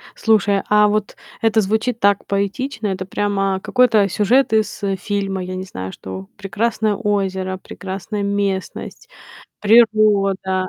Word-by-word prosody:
Слушай, 205 -3 +2
а 210 0 +5
вот 210 0 -2 0.3
это 225 0 +3
звучит 220 +4 -1
так 200 -1 +2
поэтично. 210 +3 -2
Это 190 -1 -3
прямо 195 -1 -1
какой-то 225 -5 +3
сюжет 220 +7 +2
из 220 0 0 0.2
фильма. 195 -2 -2
Я 185 +1 -5
не 185 - -5
знаю, 95 - -7
что 95 0 -8
прекрасное 210 +2 -1
озеро, 190 -3 -1
прекрасная 195 +2 -6
местность, 200 -1 -3 0.5
природа 205 -4 +3
200 Hz, 125 wpm, -19 LUFS, 190-215 Hz, 0.5 s, а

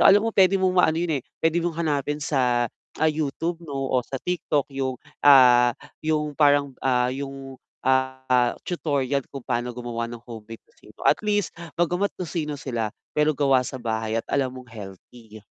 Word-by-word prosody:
So - - +7
alam 205 +2 +6
mo 225 - -1
pwede 195 -1 +5
mong 185 -1 +1
maano 160 -1 +3
yun, 170 -1 0
eh, - - -26 0.2
pwede 165 +1 +3
mong 170 -1 -2
hanapin 150 -3 -1
sa, 125 -5 +2 0.3
ah, 160 - +3
YouTube 160 +3 -2
'no 140 -5 -4
o 130 - +3
sa 125 +2 -6
TikTok 165 -5 0
yung, 130 -1 -2 0.2
ah, 125 -4 +7 0.2
yung 155 -1 0
parang, 145 -1 +3
ah, 125 -1 +2
yung 135 -1 -7 0.2
ah, 130 -1 +2
tutorial 140 -5 -1
kung 135 -3 -9
pano 120 -1 -1
gumawa 115 -1 -4
ng 120 -1 -8
homemade 115 -1 -10
tocino - - -20
at - - +4
least 205 -3 0 0.2
bagamat 180 +4 +1
tocino 160 -4 -3
sila, 120 -6 -3 0.3
pero 150 -1 +2
gawa 135 -3 +4
sa 130 - -5
bahay 110 -1 -2
at 115 - -2
alam 130 -2 0
mong 125 -1 -11
healthy. 110 +2 -11
135 Hz, 175 wpm, -24 LUFS, 125-160 Hz, 0.3 s, So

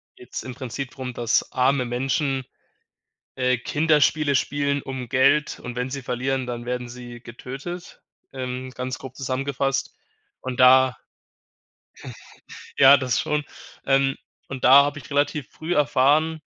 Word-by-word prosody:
geht's 375 -1 -8
im 130 - -7
Prinzip 130 0 -6
drum, 130 -1 -6
dass 120 -1 0
arme 130 0 +2
Menschen, 135 +2 -1 0.9
äh, 125 -1 +1
Kinderspiele 150 +1 +2
spielen 140 +1 0
um 130 -3 -6
Geld 135 +3 +2
und 125 -1 -7
wenn 125 +1 -2
sie 135 +1 -5
verlieren, 130 +1 -2
dann 120 -1 -5
werden 125 0 -3
sie 120 0 -10
getötet 135 +10 -8 0.3
ähm, 130 -1 -5
ganz 130 +1 -4
grob 130 -1 -10
zusammengefasst. 135 +1 -2 0.5
Und 130 -1 -5
da 130 0 +6 1.8
ja, 140 +1 +8
das 125 -4 0
schon, 150 -1 -1 0.4
ähm, 135 0 +2 0.3
und 130 -2 -7
da 135 +3 +9
habe 145 +1 -3
ich 140 - -14
relativ 145 -1 0
früh 165 +3 -3
erfahren, 150 +3 +2
130 Hz, 135 wpm, -23 LUFS, 125-140 Hz, 1.8 s, da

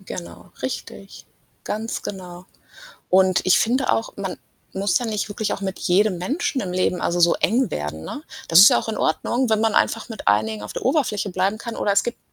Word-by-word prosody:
Genau, 185 -2 -9
richtig, - - -7 0.4
ganz 220 +2 -4
genau. 180 -2 -8 0.6
Und 185 0 +4
ich 185 - +5
finde 255 +4 +1
auch, 225 - -2
man 195 -2 -4 0.4
muss 195 0 +1
ja 245 - -4
nicht 215 -2 -2
wirklich 210 +1 -3
auch - - -4
mit 190 -1 -4
jedem 190 +2 +2
Menschen 270 - -2
im 180 - -4
Leben 180 0 0
also 175 0 0
so 170 0 +5
eng 245 +5 +1
werden, 75 +2 -5
ne? 290 - -7 0.3
Das 165 - +6
ist 200 - +10
ja - - +4
auch - - -5
in 220 - -2
Ordnung, 240 +10 0
wenn 220 -1 +2
man 220 -1 +1
einfach 225 - +1
mit 225 - -4
einigen 105 +1 +1
auf 105 - -7
der - - -6
Oberfläche 245 -8 0
bleiben 190 +4 0
kann 235 0 -6
oder 200 - +1
es 200 - +3
gibt 240 - -4
200 Hz, 210 wpm, -22 LUFS, 180-225 Hz, 0.6 s, ist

